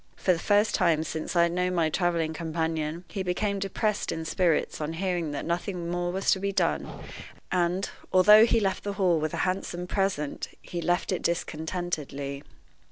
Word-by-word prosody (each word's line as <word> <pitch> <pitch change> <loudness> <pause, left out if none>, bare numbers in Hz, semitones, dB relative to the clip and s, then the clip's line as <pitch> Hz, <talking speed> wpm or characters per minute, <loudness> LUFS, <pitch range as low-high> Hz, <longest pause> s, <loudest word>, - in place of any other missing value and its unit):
For 185 - +2
the 165 - -3
first 205 +3 +3
time 160 -2 +3
since 160 +2 -4
I 170 - +6
had 170 - +2
known 180 +1 0
my 160 -2 +2
traveling 170 -2 0
companion, 160 0 -2
he 195 - -4
became 200 +2 -1
depressed 205 +2 -1
in 160 0 -4
spirits 165 -3 +1
on 155 +2 -2
hearing 175 -2 -1
that 145 - -4
nothing 170 0 -2
more 175 0 -1
was 190 +2 +1
to 190 - +3
be 200 +1 -1
done, 200 - 0 0.6
and, 180 +1 +1 0.2
although 210 +4 +8
he 230 - +3
left 195 -3 -1
the 205 - -3
Hall 185 -4 +2
with 155 0 -2
a - - 0
handsome 185 -1 -2
present, 185 -6 -1
he 175 - -6
left 175 +3 0
it 185 - -1
discontentedly. 155 -4 -3
175 Hz, 180 wpm, -27 LUFS, 160-190 Hz, 0.6 s, although